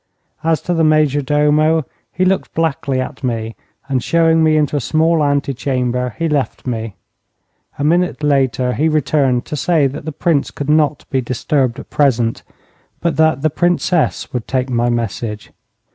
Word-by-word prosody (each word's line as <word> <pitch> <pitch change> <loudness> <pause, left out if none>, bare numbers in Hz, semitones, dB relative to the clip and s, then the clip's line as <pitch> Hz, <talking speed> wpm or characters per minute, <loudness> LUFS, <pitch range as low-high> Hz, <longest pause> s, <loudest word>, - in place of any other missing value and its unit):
As 160 -1 +1
to 180 - -1
the 165 -1 +1
major 155 -2 +3
domo, 150 +2 +2 0.3
he 185 - 0
looked 190 +1 0
blackly 150 -4 -1
at 130 +2 -5
me, 115 -3 -3 0.3
and 130 -3 -1
showing 165 -1 +3
me 155 -1 +3
into 150 -1 +1
a - - +1
small 160 +4 +2
ante 140 -1 0
chamber 125 -2 -2
he 165 - 0
left 145 -4 -2
me. 115 -4 -4 0.8
A 145 - -3
minute 170 +1 +1
later 130 -3 +1
he 155 +5 +1
returned 140 -4 +1
to - - -5
say 150 +1 +2
that 135 +2 -4
the 160 - -3
Prince 155 -1 0
could 145 +1 -3
not 150 -2 +1
be 130 - +1
disturbed 125 +1 -1
at - - -11
present, 120 -5 +1 0.6
but 170 -2 -1
that 160 -2 +2
the 155 - +2
Princess 175 0 0
would 125 -3 -3
take 130 0 -1
my 120 0 +1
message. 115 -2 -3
145 Hz, 170 wpm, -17 LUFS, 125-155 Hz, 0.8 s, major